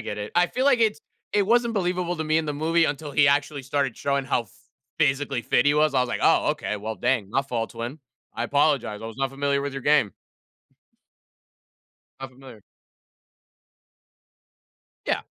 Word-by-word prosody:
get 105 Hz, -2 st, -5 dB
it. 105 Hz, 0 st, -6 dB
I 175 Hz, +1 st, +4 dB
feel 255 Hz, +8 st, -2 dB
like 270 Hz, -4 st, +4 dB
it's 220 Hz, -1 st, +2 dB, 0.3 s
it 205 Hz, -2 st, +2 dB
wasn't 235 Hz, +1 st, +2 dB
believable 180 Hz, -2 st, -1 dB
to 160 Hz, -, -3 dB
me 155 Hz, +1 st, +2 dB
in 160 Hz, -, -1 dB
the 150 Hz, -, -2 dB
movie 165 Hz, +3 st, +2 dB
until 145 Hz, -1 st, -3 dB
he 145 Hz, +1 st, +4 dB
actually 145 Hz, 0 st, +1 dB
started 135 Hz, -2 st, -1 dB
showing 140 Hz, -1 st, -1 dB
how 125 Hz, -, 0 dB
ph 115 Hz, -, -22 dB, 0.5 s
physically 140 Hz, -4 st, +1 dB
fit -, -, +2 dB
he 145 Hz, -, +4 dB
was. 150 Hz, -1 st, +2 dB
I 130 Hz, -, +3 dB
was 125 Hz, -, 0 dB
like, -, -, -3 dB
"Oh, -, -, +4 dB
okay. 105 Hz, -, -3 dB
Well, 110 Hz, +2 st, -5 dB
dang." 105 Hz, 0 st, -1 dB
No 135 Hz, +4 st, +1 dB
fault 120 Hz, -5 st, -3 dB
to 115 Hz, -, -8 dB
him. 125 Hz, +6 st, -5 dB, 0.4 s
"I 120 Hz, -, -2 dB
apologize. 140 Hz, -6 st, +1 dB
I -, -, -5 dB
was 115 Hz, 0 st, -9 dB
not 135 Hz, 0 st, -1 dB
familiar 140 Hz, 0 st, 0 dB
with 140 Hz, 0 st, -4 dB
your 135 Hz, -1 st, -6 dB
game." 145 Hz, -9 st, +3 dB, 2.1 s
Not 135 Hz, -1 st, -7 dB
familiar. 130 Hz, -4 st, -14 dB, 2.5 s
Yeah. -, -, 0 dB
140 Hz, 190 wpm, -24 LUFS, 125-155 Hz, 2.5 s, I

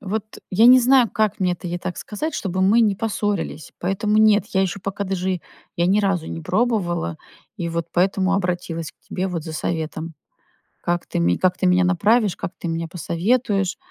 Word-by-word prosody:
вот 205 Hz, +2 st, -3 dB, 0.3 s
я 220 Hz, +5 st, +5 dB
не 255 Hz, +1 st, +9 dB
знаю, 250 Hz, -2 st, +4 dB
как 215 Hz, -2 st, 0 dB
мне 180 Hz, -1 st, +2 dB
это 175 Hz, +1 st, -7 dB
ей 175 Hz, +1 st, -3 dB
так 180 Hz, -, -5 dB
сказать, 305 Hz, +10 st, -4 dB
чтобы 190 Hz, -1 st, -2 dB
мы 215 Hz, +5 st, +5 dB
не 210 Hz, -3 st, +3 dB
поссорились, 205 Hz, -6 st, -3 dB
поэтому 205 Hz, +4 st, +1 dB
нет, 215 Hz, -1 st, +5 dB
я 190 Hz, -, +4 dB
ещё 190 Hz, +1 st, -2 dB
пока 200 Hz, +1 st, -4 dB
даже 185 Hz, -2 st, -2 dB, 0.4 s
я 170 Hz, +1 st, +2 dB
ни 200 Hz, +3 st, +3 dB
разу 195 Hz, -5 st, 0 dB
не 165 Hz, -, -5 dB
пробовала 180 Hz, -, 0 dB, 0.4 s
и 170 Hz, -, -3 dB
вот 165 Hz, 0 st, -3 dB
поэтому 190 Hz, +1 st, +2 dB
обратилась 175 Hz, -4 st, -2 dB
к -, -, -56 dB
тебе 185 Hz, -, -2 dB
вот 170 Hz, -3 st, -3 dB
за 160 Hz, -, -7 dB
советом. 160 Hz, 0 st, -3 dB, 0.7 s
Как 175 Hz, 0 st, -1 dB
ты -, -, -3 dB
ме 85 Hz, +1 st, +2 dB
как 180 Hz, 0 st, +1 dB
ты 185 Hz, -1 st, +1 dB
меня 180 Hz, 0 st, +4 dB
направишь, 205 Hz, +3 st, +2 dB
как -, -, -5 dB
ты 170 Hz, -, -5 dB
мне 165 Hz, 0 st, -2 dB
посоветуешь? 195 Hz, -, 0 dB
185 Hz, 195 wpm, -22 LUFS, 175-210 Hz, 0.7 s, не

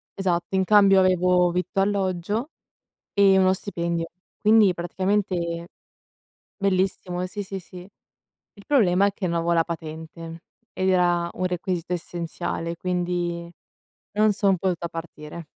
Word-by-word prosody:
esatto. 180 Hz, -1 st, -1 dB
In 190 Hz, -, +3 dB
cambio 195 Hz, -1 st, +6 dB
avevo 180 Hz, -1 st, +3 dB
vitto, 180 Hz, +2 st, -1 dB
alloggio 200 Hz, -, -1 dB, 0.6 s
e 195 Hz, -1 st, +5 dB
uno 185 Hz, 0 st, +4 dB
stipendio, 170 Hz, -3 st, -3 dB, 0.3 s
quindi 215 Hz, -3 st, +5 dB
praticamente 175 Hz, -1 st, -1 dB, 0.9 s
bellissimo, 185 Hz, -2 st, -1 dB
sì, 205 Hz, +3 st, -5 dB
sì, 195 Hz, 0 st, -6 dB
sì. 180 Hz, 0 st, -12 dB, 0.8 s
Il 200 Hz, -, -16 dB
problema 200 Hz, -8 st, +4 dB
è 200 Hz, -, 0 dB
che 190 Hz, -2 st, -3 dB
non 170 Hz, -, -1 dB
avevo 170 Hz, +1 st, 0 dB
la 165 Hz, -, +4 dB
patente 165 Hz, 0 st, -7 dB, 0.3 s
ed 185 Hz, 0 st, -1 dB
era 175 Hz, -2 st, +2 dB
un 185 Hz, -, -3 dB
requisito 180 Hz, -1 st, -3 dB
essenziale, 170 Hz, -1 st, -4 dB
quindi 175 Hz, -1 st, -2 dB, 0.6 s
non 215 Hz, +1 st, +3 dB
son 195 Hz, -2 st, +2 dB
potuta 175 Hz, -1 st, -2 dB
partire. 165 Hz, -1 st, -8 dB
180 Hz, 125 wpm, -24 LUFS, 170-195 Hz, 0.9 s, cambio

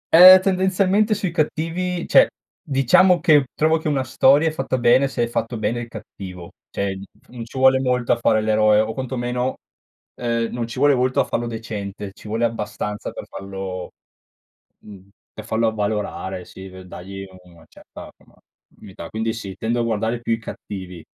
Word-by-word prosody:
Ehm, 185 Hz, +2 st, +11 dB
tendenzialmente 195 Hz, +3 st, +2 dB
sui 190 Hz, -4 st, -2 dB
cattivi 170 Hz, +2 st, -2 dB
cioè, -, -, +6 dB, 0.3 s
diciamo, 175 Hz, +7 st, +4 dB
che 150 Hz, -5 st, +4 dB
trovo 160 Hz, +1 st, +2 dB
che 160 Hz, -, -5 dB
una 140 Hz, -3 st, 0 dB
storia 140 Hz, +5 st, +4 dB
è 160 Hz, -, +1 dB
fatta 135 Hz, -3 st, -2 dB
bene 125 Hz, +3 st, +4 dB
se 120 Hz, -3 st, -2 dB
è -, -, 0 dB
fatto 115 Hz, 0 st, -3 dB
bene 120 Hz, +2 st, -1 dB
il 120 Hz, -, -6 dB
cattivo. 95 Hz, -5 st, -10 dB, 0.2 s
Cioè, 100 Hz, -1 st, -3 dB
mhmm, 95 Hz, -, -9 dB, 0.2 s
f -, -, -30 dB
non 120 Hz, -2 st, -8 dB
ci 130 Hz, -, -11 dB
vuole 130 Hz, 0 st, +5 dB
molto 125 Hz, -2 st, 0 dB
a -, -, +3 dB
fare 110 Hz, -2 st, +2 dB
l'eroe, 110 Hz, 0 st, +3 dB
o 110 Hz, +1 st, 0 dB
quantomeno, 125 Hz, -1 st, -3 dB, 0.7 s
uhm, 115 Hz, -1 st, -1 dB
non 120 Hz, -1 st, -3 dB
ci 115 Hz, -, -9 dB
vuole 145 Hz, 0 st, +5 dB
molto 130 Hz, +1 st, +1 dB
a -, -, -1 dB
fallo 120 Hz, 0 st, -2 dB
decente, 105 Hz, -3 st, -6 dB
ci 105 Hz, -, -14 dB
vuole 115 Hz, +2 st, 0 dB
abbastanza 105 Hz, -2 st, -4 dB
per -, -, -8 dB
fallo 95 Hz, -2 st, -7 dB, 0.9 s
mhmm, 100 Hz, -2 st, -14 dB, 0.2 s
per 110 Hz, -, -9 dB
farlo 110 Hz, +1 st, 0 dB
avvalorare, 105 Hz, -3 st, -3 dB
sì, 95 Hz, 0 st, -11 dB
v 95 Hz, 0 st, -11 dB
dagli 95 Hz, +2 st, -9 dB, 0.2 s
una 85 Hz, -3 st, -19 dB
certa, -, -, -13 dB
insomma, -, -, -24 dB, 0.5 s
unità. 95 Hz, -4 st, -10 dB
Quindi, 110 Hz, +1 st, -2 dB
sì, 100 Hz, -4 st, -7 dB
tendo 115 Hz, +3 st, -1 dB
a -, -, 0 dB
guardare 115 Hz, +1 st, -1 dB
più 115 Hz, -, -1 dB
i 115 Hz, -, 0 dB
cattivi 95 Hz, -6 st, -8 dB
115 Hz, 180 wpm, -21 LUFS, 105-135 Hz, 0.9 s, Ehm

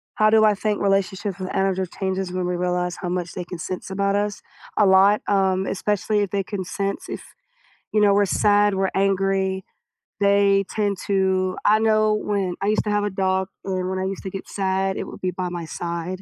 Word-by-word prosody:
How 215 Hz, 0 st, +4 dB
do 220 Hz, 0 st, +5 dB
I 215 Hz, -1 st, +5 dB
think 210 Hz, +2 st, -1 dB
relationships 195 Hz, 0 st, 0 dB
with 185 Hz, 0 st, -5 dB
animals 190 Hz, -1 st, 0 dB
changes 190 Hz, -1 st, -2 dB
when 185 Hz, 0 st, -2 dB
we 180 Hz, -, -1 dB
realize 180 Hz, 0 st, -1 dB
how 180 Hz, -, -4 dB
much 180 Hz, -1 st, -2 dB
they 180 Hz, -2 st, -5 dB
can 180 Hz, -, -7 dB
sense 185 Hz, +2 st, -5 dB
about 200 Hz, +1 st, 0 dB
us? 205 Hz, 0 st, -1 dB, 0.4 s
A 210 Hz, -, +5 dB
lot, 195 Hz, +2 st, +5 dB
um, 190 Hz, -1 st, +2 dB
especially 205 Hz, +2 st, 0 dB
if 205 Hz, -, 0 dB
they 200 Hz, -1 st, 0 dB
can 195 Hz, 0 st, -4 dB
sense 195 Hz, +2 st, -3 dB
if, -, -, -5 dB, 0.7 s
you 215 Hz, -, +3 dB
know, 205 Hz, -1 st, +5 dB
we're 205 Hz, 0 st, +3 dB
sad, 205 Hz, +2 st, +3 dB
we're 190 Hz, 0 st, 0 dB
angry. 195 Hz, -1 st, +1 dB, 0.6 s
They 200 Hz, 0 st, +4 dB
tend 205 Hz, -3 st, -1 dB
to 190 Hz, -1 st, +1 dB
I 215 Hz, +1 st, +5 dB
know 215 Hz, -1 st, +3 dB
when 200 Hz, -4 st, -1 dB
I 200 Hz, -, 0 dB
used 215 Hz, +1 st, +2 dB
to -, -, -1 dB
have 205 Hz, 0 st, +1 dB
a 205 Hz, -, 0 dB
dog, 190 Hz, -1 st, 0 dB, 0.2 s
and 185 Hz, -1 st, -2 dB
when 190 Hz, 0 st, -2 dB
I -, -, -1 dB
used 190 Hz, 0 st, -4 dB
to 190 Hz, -, -4 dB
get 195 Hz, 0 st, -7 dB
sad, 190 Hz, -1 st, -1 dB
it -, -, -3 dB
would -, -, -10 dB
be 185 Hz, -, -1 dB
by 180 Hz, 0 st, -3 dB
my 175 Hz, -1 st, -5 dB
side, 170 Hz, +3 st, -4 dB
195 Hz, 215 wpm, -23 LUFS, 185-205 Hz, 0.7 s, do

